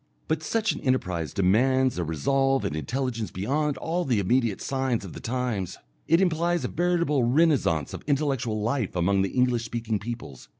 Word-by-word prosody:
But 160 -1 0
such 215 +6 0
an - - -6
enterprise 90 - -1
demands 125 +5 +2
a - - 0
resolve 135 - +1
and - - -2
intelligence 115 - -2
beyond 140 +10 -1
all 175 +2 -1
the 125 -8 +1
immediate 115 +1 +1
signs 130 -5 -1
of 90 - -9
the - - -8
times; 120 -6 -2 0.3
it 165 +2 +4
implies 175 -1 +1
a - - -2
veritable 170 -5 +1
renascence 125 - +2
of - - -6
intellectual 135 -7 0
life 115 -1 -1
among 95 +3 +2
the 95 - 0
English 125 0 +1
speaking 115 -2 -2
peoples. 110 - -7
125 Hz, 170 wpm, -26 LUFS, 100-145 Hz, 0.3 s, it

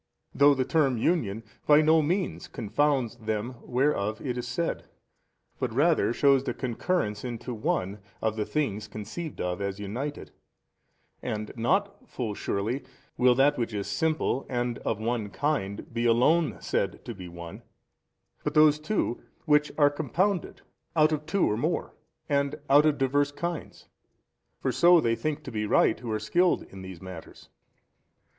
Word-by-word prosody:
though 145 0 +6
the 130 -1 0
term 135 -4 +2
union 115 - 0 0.2
by 150 0 +7
no 155 +1 +5
means 175 +5 -1
confounds 120 +1 0
them 110 +2 -3
whereof 120 -5 0
it 125 -4 -3
is 125 0 -4
said, 165 +8 -2 0.7
but 125 - -1
rather 150 +3 +3
shews 135 +1 +4
the - - -3
concurrence 120 - -1
into 120 0 -5
one 110 - -1 0.2
of 110 -1 -1
the 110 - -1
things 105 -7 -2
conceived 110 +10 -7
of 90 +1 -2
as 100 0 -3
united: 125 +9 -5 0.9
and 105 0 -4
not 195 - 0
(full 115 -5 -3
surely) 110 +7 -2 0.3
will 125 0 +4
that 140 +1 +3
which 115 -2 -2
is 100 -1 -2
simple 145 +5 0
and 120 -1 -1
of 110 - -2
one 110 -2 -2
kind 110 -6 -2
be 120 +1 -1
alone 150 +8 +3
said - - -2
to 120 - -5
be 95 -4 -9
One 85 -1 -9
15, - - -28 0.8
but 150 - -2
those 150 -1 +6
too 155 - -1 0.2
which 150 -1 +3
are 145 -2 +5
compounded 170 +6 -1 0.3
out 155 -1 +5
of 150 0 -2
two 190 +4 +2
or 105 - 0
more 120 - -1 0.3
and 140 0 +1 0.2
out 145 +2 +7
of 150 -2 +2
diverse 140 +1 +1
kinds. 170 +3 -5 0.7
For - - 0
so 175 0 +6
they 115 -6 +1
think 155 +3 -3
to 135 - -7
be 105 -1 -2
right 110 - +3
who 120 -3 -5
are 110 - +1
skilled 175 +11 +2
in 95 - -12
these 95 -2 -9
matters. 95 -3 -10
130 Hz, 160 wpm, -27 LUFS, 110-150 Hz, 0.9 s, by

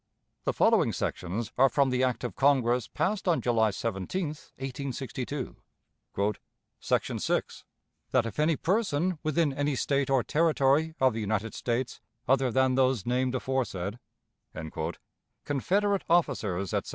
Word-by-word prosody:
The - - +1
following - - +3
sections 100 +6 -3
are 135 +1 +7
from 135 +1 +2
the 125 +1 +1
act 125 -1 0
of 125 - -4
Congress 125 -4 +3
passed 195 +1 -1
on 170 -3 +3
July 115 -3 +2
17, 115 - -2 0.3
1862: 135 0 -4 1.2
"Section - - 0
6. - - -1 0.5
That 125 -3 +2
if 115 - -5
any 155 +1 +3
person, 180 -2 0
within 155 -1 +1
any 145 +1 0
State 140 0 0
or 135 -3 +3
Territory 155 +2 +2
of 130 -2 +4
the 110 - -3
United 110 +1 -1
States 120 +1 -2 0.3
other 135 0 +3
than 130 +1 +3
those 130 -5 +2
named 125 +1 0
aforesaid" 120 -6 -2 1.5
(Confederate 195 +8 +1
officers, 110 - +1
etc.) - - -1
130 Hz, 130 wpm, -28 LUFS, 120-150 Hz, 1.5 s, are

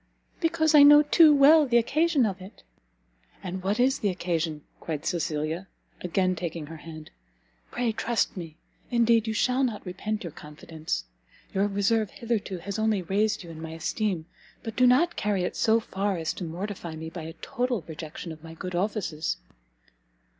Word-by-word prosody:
"Because 325 -2 +2
I 300 - +9
know 295 +1 +9
too 315 +1 +6
well 295 +1 +6
the 240 -1 +4
occasion 295 +3 +2
of 190 -3 -3
it!" 190 +2 -13 0.8
"And 185 0 -4
what 200 +5 -1
is 260 +2 +3
the 205 - +1
occasion?" 165 -4 -2 0.2
cried 155 -3 -5
Cecilia, 160 +2 -2 0.3
again 185 +1 +1
taking 170 -3 -4
her 160 +2 -9
hand, 155 0 -10 0.6
"pray 240 -2 -1
trust 230 +1 -1
me; 165 -4 -8 0.3
indeed 235 -1 +3
you 220 - -1
shall 255 +4 +2
not 230 -6 -2
repent 210 +4 -4
your 170 - -6
confidence. 155 +2 -6 0.5
Your 195 +1 +2
reserve 205 +1 +1
hitherto 220 -5 -3
has 200 +4 -5
only 215 -3 +1
raised 205 +3 0
you 170 - -10
in 160 -1 -9
my 160 0 -6
esteem, 170 +1 -2 0.4
but 225 -1 -6
do 250 0 +5
not 330 +8 +4
carry 205 -3 0
it - - -3
so 225 0 +3
far 200 -3 -2
as 160 -1 -2
to 180 - -6
mortify 175 0 -5
me 160 +1 -7
by 165 - -7
a 160 +1 -7
total 250 -5 -2
rejection 160 +1 -7
of 160 0 -11
my 165 0 -10
good 180 +2 -6
offices." 175 -4 -2
195 Hz, 175 wpm, -27 LUFS, 165-235 Hz, 0.8 s, I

